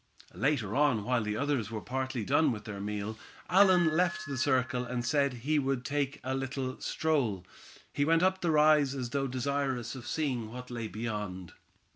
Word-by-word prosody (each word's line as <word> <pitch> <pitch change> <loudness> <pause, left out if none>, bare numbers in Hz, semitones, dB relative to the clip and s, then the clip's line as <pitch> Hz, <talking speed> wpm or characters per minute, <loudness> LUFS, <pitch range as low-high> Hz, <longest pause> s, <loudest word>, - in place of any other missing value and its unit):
Later 130 -7 0
on 140 -7 +3
while 125 +1 +1
the 105 0 -2
others 140 -6 0
were 110 -2 -4
partly 130 -1 -3
done 145 +1 +3
with 110 -3 -5
their 105 -2 -6
meal, 105 +1 -4 0.3
Allan 180 -4 +5
left 180 +5 +1
the 140 - -4
circle 130 -2 +1
and 120 0 -3
said 140 +2 +2
he 155 0 +3
would 135 -2 -1
take 145 -1 -1
a 130 +1 -2
little 135 -1 -3
stroll. 125 - 0 0.5
He 145 - +1
went 165 +3 +3
up 185 0 +2
the 175 - 0
rise, 150 -3 +4
as 125 -3 -4
though 140 -1 0
desirous 130 -1 -2
of 130 -3 -8
seeing 130 -8 -1
what 125 +1 -8
lay 115 -2 -4
beyond. 105 -5 -5
130 Hz, 180 wpm, -30 LUFS, 115-145 Hz, 0.5 s, Allan